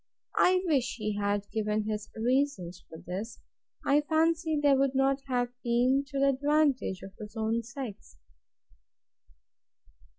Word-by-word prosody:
I 365 0 +4
wish 265 -6 +1
he 215 -2 -2
had 205 0 0
given 215 -1 0
his 215 0 -4
reasons 235 -7 0
for 160 - -9
this! 200 +6 -5 0.5
I 290 +2 +4
fancy 320 0 +1
they 290 -1 +4
would 270 0 +2
not 270 +1 +2
have 245 -2 0
been 250 +3 +2
to 280 -1 -5
the 275 0 +4
advantage 280 -7 +1
of 195 - -9
his 215 0 -9
own 225 +1 0
sex. 230 - -8
250 Hz, 135 wpm, -29 LUFS, 215-280 Hz, 0.5 s, I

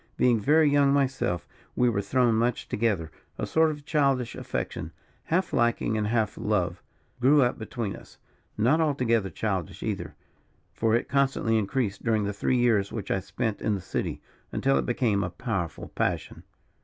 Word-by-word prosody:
Being 120 -3 +4
very 150 +8 +4
young 140 -1 +4
myself, 130 -11 0 0.3
we 125 - +3
were 105 -4 +1
thrown 120 +3 +2
much 115 +2 0
together, 100 -8 -1 0.3
a - - -2
sort 160 0 +3
of 145 -2 -6
childish 135 -6 +1
affection, - - -4 0.3
half 180 +2 0
liking 120 -2 +1
and 105 -1 0
half 110 -1 0
love, 90 -5 0 0.4
grew 140 +3 +5
up 120 - 0
between 110 -2 -4
us - - -15 0.4
not 130 +10 +3
altogether 120 -9 +1
childish 95 -1 -3
either; - - -4 0.6
for 115 0 +2
it 120 - 0
constantly 135 -5 +1
increased 110 -1 -1
during 110 -2 +1
the 100 0 -2
three 125 +5 0
years 110 -5 +2
which 110 - -4
I 95 - +2
spent 110 +3 -3
in 105 - +1
the - - -3
city, - - -4 0.3
until 135 0 +2
it - - -3
became 115 -5 +1
a 90 - -2
powerful 100 - -4
passion. - - -2
115 Hz, 165 wpm, -27 LUFS, 105-135 Hz, 0.6 s, grew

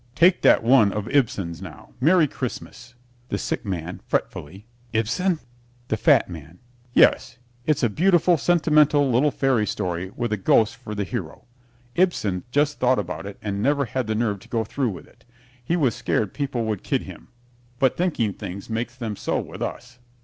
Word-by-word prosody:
Take 180 +2 +4
that - - +5
one 115 -4 +5
of 105 +1 -4
Ibsen's 100 - 0
now, 85 -7 -11
"Merry 165 +2 +5
Christmas" 125 -1 -7 0.3
THE - - -1
SICK - - -3
MAN 90 -2 -4
(fretfully) 95 +8 -3 0.3
Ibsen? 135 - +1 0.5
THE - - +1
FAT - - +4
MAN 80 +2 -10 0.3
Yes, 125 0 +4 0.3
it's 150 -3 +1
a - - +5
beautiful, 175 - +3
sentimental 150 -4 +3
little 130 +6 +3
fairy 130 -6 +1
story 90 -2 -3
with 120 -2 -2
a - - 0
ghost 110 +3 +3
for 110 -3 -7
the 100 - -1
hero. 95 - -6 0.5
Ibsen 110 - 0
just 145 +3 +1
thought 130 0 +3
about 95 0 -4
it 100 - -8
and 100 -1 -2
never 140 +3 +2
had 125 0 -3
the 110 - -1
nerve 105 -3 0
to - - -18
go 115 -2 0
through 125 +3 -2
with 95 - -8
it. - - -24 0.4
He 165 +8 0
was 140 -9 +2
scared 105 -4 -1
people 135 -5 -2
would 110 -3 -2
kid - - -1
him, - - -11 0.5
but 130 0 +2
thinking 150 - 0
things 100 +2 -8
makes 120 +2 -3
them 115 -5 -4
so - - -1
with - - -8
us. 125 0 -6
120 Hz, 180 wpm, -23 LUFS, 100-140 Hz, 0.5 s, that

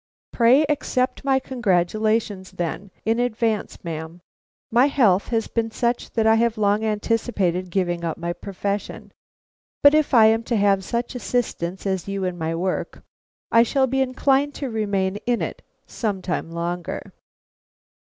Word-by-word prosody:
"Pray 250 +5 +5
accept 265 -3 -1
my 270 -1 +3
congratulations, 215 -3 0
then, 175 +3 -4 0.2
in 225 +2 +1
advance, 230 -3 -1
ma'am. 160 0 -6 0.5
My 245 +4 +5
health 220 -10 +3
has 225 -2 -1
been 230 -1 -1
such 235 +2 -1
that 225 -2 +1
I 220 - +6
have 230 0 +2
long 210 0 +2
anticipated 210 -4 0
giving 175 -2 -1
up 165 -2 -2
my 170 0 -3
profession; 200 +2 -5 0.7
but 285 0 +8
if 310 -1 +3
I 225 -2 +8
am 225 +1 +4
to 235 - 0
have 200 -2 +3
such 235 +6 -3
assistants 220 -8 -2
as 190 -2 -2
you 195 -1 -3
in 180 -1 -2
my 165 -1 -2
work, 185 +2 -3 0.5
I 230 - +6
shall 265 +3 +2
be 265 +1 0
inclined 270 +2 +1
to 275 -4 -4
remain 200 -3 -1
in 245 -1 +2
it - - -4 0.2
some 205 -5 -3
time 175 -2 -2
longer." 170 +1 -4
215 Hz, 150 wpm, -23 LUFS, 185-240 Hz, 0.7 s, but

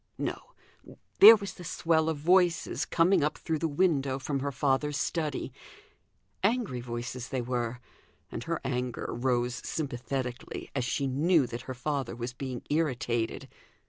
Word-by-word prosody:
No! - - -5 0.6
there 220 +3 +12
was 200 -3 -5
the 180 - -11
swell 165 -2 +1
of 160 - -1
voices 170 +1 +2
coming 175 0 +3
up 150 +1 0
through 160 -3 -2
the 165 - 0
window 145 -4 +1
from 140 +1 -2
her 140 +1 -2
father's 140 +1 0
study: 150 0 -2 0.9
angry 205 - +1
voices 120 +1 -5
they 130 - -2
were; 120 -1 -2 0.5
and 115 - -5
her 165 -1 -1
anger 125 -2 -2
rose 120 0 0
sympathetically, 130 -3 -4
as 130 -3 -1
she 140 +3 -1
knew 145 +3 +3
that 120 0 -6
her 130 - -4
father 135 -1 -2
was 120 +1 -5
being 130 -1 -5
irritated. 125 -7 -1
135 Hz, 145 wpm, -29 LUFS, 125-160 Hz, 0.9 s, there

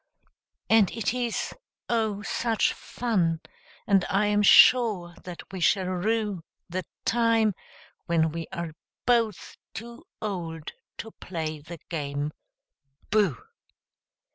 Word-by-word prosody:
And 220 -4 +5
it 225 -1 -1
is, 240 -2 -2 0.3
oh, 220 -3 0
such 225 -2 +1
fun 180 -9 -1 0.5
I 195 +1 +3
am 205 0 +3
sure 205 -5 +6
that 180 +1 -9
we 190 - -4
shall 190 +2 +3
rue 200 0 -1 0.2
The 185 +1 -4 0.2
time 230 -2 +3 0.5
when 160 -2 +2
we 165 0 -5
are 170 -1 -4 0.3
both 230 -5 +1 0.2
too 235 +7 -8
old 170 -7 -4 0.3
to 225 - -7
play 160 -6 -5
the 165 +3 -9
game 145 -2 -2 0.8
"Booh!" 200 - +2
195 Hz, 110 wpm, -27 LUFS, 170-225 Hz, 0.8 s, sure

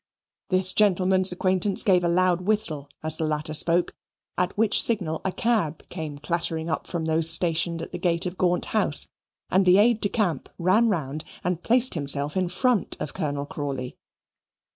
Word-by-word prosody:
This 185 -1 +3
gentleman's 190 -2 +3
acquaintance 185 +2 +1
gave 180 -3 +3
a - - +1
loud 180 0 +1
whistle 180 -8 -2
as 155 0 -5
the - - -3
latter 155 0 -3
spoke, 170 +3 +2 0.4
at 180 +2 -2
which 215 -1 +3
signal 180 -9 +1
a 190 - -1
cab 205 -9 -2
came 155 -5 -6
clattering 165 +1 -3
up - - -4
from 170 -3 -4
those 160 0 +2
stationed 165 0 -1
at - - -9
the - - -6
gate 170 0 0
of 180 0 -4
Gaunt 180 -1 0
House - - +5 0.4
and 190 - +3
the 180 0 +5
aide 220 +2 +3
de 205 - 0
camp 185 - -2
ran 200 +7 +2
round 155 -5 -3 0.2
and 180 -1 -2
placed 250 +4 +2
himself 145 -1 0
in 185 -2 -1
front 230 +4 0
of 150 - -5
Colonel 145 -5 -3
Crawley. 135 -4 -5
175 Hz, 175 wpm, -24 LUFS, 160-190 Hz, 0.4 s, House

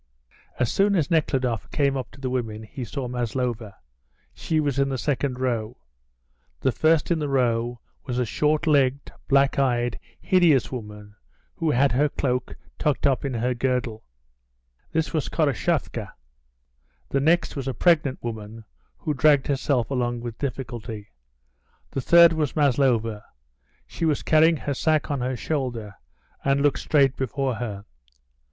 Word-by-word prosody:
As 120 - 0
soon 200 +1 +3
as 160 -5 0
Nekhludoff 130 -7 0
came 140 -2 +1
up 130 -2 -4
to 135 - -17
the 130 -2 -3
women 110 -4 -3
he 125 +4 -7
saw 130 +2 -4
Maslova; 120 -3 -3 0.6
she 160 - -1
was 145 -3 0
in 140 0 +2
the 135 - -2
second 135 -1 -1
row. 120 -3 -2 0.8
The - - +2
first 160 +4 +2
in 165 - +2
the 150 -2 -2
row 120 -3 0 0.3
was 125 -2 -2
a 125 - +1
short 150 +7 0
legged, 140 -3 +2 0.2
black 140 0 +3
eyed, 120 -3 +1 0.2
hideous 170 -8 +3
woman, 105 -4 -8 0.4
who 165 -2 0
had 140 0 +3
her 145 +4 +2
cloak 125 -3 -2 0.2
tucked 150 -1 0
up 135 -2 +2
in 135 -3 -2
her 125 +2 0
girdle. 120 -3 -2 0.9
This 160 0 -1
was 155 -3 -1
Koroshavka. 145 -8 -1 1.0
The 140 - +1
next 165 +4 +2
was 135 -2 -4
a 135 - -1
pregnant 155 -6 +2
woman, 110 -1 -6 0.3
who 155 - -2
dragged 145 -1 +4
herself 135 -3 0
along 120 -2 -1
with 115 -1 -7
difficulty. 120 -6 -5 0.8
The 135 - -2
third 170 +4 +7
was 155 -4 -1
Maslova; 120 -7 +2 0.6
she 165 - -4
was 155 -3 +1
carrying 160 +1 +4
her 145 - -3
sack 155 +2 +1
on 140 -3 -1
her 125 0 -2
shoulder, 120 -8 -3 0.5
and 140 0 +2
looking 145 0 +2
straight 140 -3 +3
before 135 0 -2
her. 110 -4 -5
130 Hz, 150 wpm, -24 LUFS, 120-145 Hz, 1.0 s, third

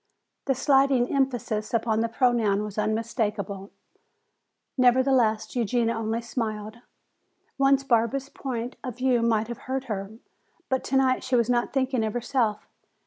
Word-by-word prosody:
The 270 - +1
slighting 270 -2 +3
emphasis 240 -5 -1
upon 220 -1 +1
the 230 +1 0
pronoun 225 -4 +2
was 210 0 -5
unmistakable; 210 -2 -2 1.1
nevertheless, 250 -4 +3
Eugenia 235 0 +1
only 225 +1 -2
smiled. 220 -2 -4 0.8
Once 275 0 +4
Barbara's 260 +2 +1
point 245 -2 -5
of 250 -4 -6
view 255 -2 +2
might 225 -2 +1
have 235 - -6
hurt 265 0 -1
her, 205 -4 -5 0.6
but 260 -1 0
tonight 265 -1 +2
she 260 0 0
was 235 0 +2
not 240 -1 +1
thinking 260 -3 0
of 215 -1 -2
herself. 240 -3 -1
235 Hz, 135 wpm, -26 LUFS, 220-260 Hz, 1.1 s, Once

